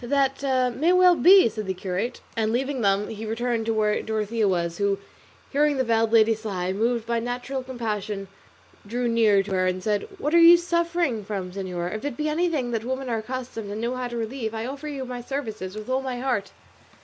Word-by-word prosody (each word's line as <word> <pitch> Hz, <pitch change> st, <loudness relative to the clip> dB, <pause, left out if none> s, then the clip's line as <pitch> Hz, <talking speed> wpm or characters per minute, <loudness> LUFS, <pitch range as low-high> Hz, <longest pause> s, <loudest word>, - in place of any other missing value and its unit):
"That 270 Hz, +1 st, +1 dB, 0.3 s
may 320 Hz, +6 st, +2 dB
well 365 Hz, 0 st, +6 dB
be," 370 Hz, 0 st, +7 dB
said 215 Hz, -2 st, -5 dB
the 190 Hz, -, -2 dB
curate, 190 Hz, +6 st, -3 dB
and 220 Hz, -1 st, 0 dB
leaving 265 Hz, +2 st, -1 dB
them 200 Hz, 0 st, +2 dB
he 220 Hz, 0 st, -6 dB
returned 230 Hz, +1 st, -2 dB
to 225 Hz, -, +2 dB
where 210 Hz, -1 st, +1 dB
Dorothea 220 Hz, 0 st, -1 dB
was, 170 Hz, -2 st, -1 dB
who, 200 Hz, -1 st, +1 dB, 0.5 s
hearing 290 Hz, 0 st, +2 dB
the 260 Hz, -, +2 dB
veiled 225 Hz, -2 st, +1 dB
lady 225 Hz, -1 st, +5 dB
sigh, 195 Hz, -4 st, -3 dB
moved 230 Hz, +3 st, 0 dB
by 235 Hz, 0 st, 0 dB
natural 245 Hz, +3 st, -3 dB
compassion 215 Hz, -6 st, -4 dB, 0.6 s
drew 240 Hz, +3 st, -1 dB
near 220 Hz, -4 st, +4 dB
to 195 Hz, -, -8 dB
her 185 Hz, -1 st, +2 dB
and 185 Hz, 0 st, -2 dB
said, 210 Hz, -, 0 dB
"What 310 Hz, -5 st, -2 dB
are 340 Hz, -, +7 dB
you 335 Hz, +1 st, +9 dB
suffering 340 Hz, -8 st, 0 dB
from, 195 Hz, -3 st, -4 dB
señora? 180 Hz, -2 st, -4 dB
If 215 Hz, -, -5 dB
it 285 Hz, -4 st, -4 dB
be 305 Hz, -, -1 dB
anything 305 Hz, -6 st, 0 dB
that 225 Hz, -2 st, -2 dB
women 260 Hz, +1 st, -3 dB
are 225 Hz, -, 0 dB
accustomed 240 Hz, -2 st, -6 dB
and 205 Hz, +1 st, -4 dB
know 235 Hz, +2 st, -2 dB
how 255 Hz, -1 st, -3 dB
to 240 Hz, -1 st, -5 dB
relieve, 225 Hz, -1 st, -3 dB
I 220 Hz, +1 st, -3 dB
offer 280 Hz, +4 st, -6 dB
you 275 Hz, -3 st, -4 dB
my 250 Hz, -1 st, -6 dB
services 220 Hz, -8 st, -5 dB
with 215 Hz, 0 st, -7 dB
all 260 Hz, +1 st, 0 dB
my 255 Hz, -2 st, -4 dB
heart." 245 Hz, -6 st, -1 dB
230 Hz, 210 wpm, -25 LUFS, 210-265 Hz, 0.6 s, you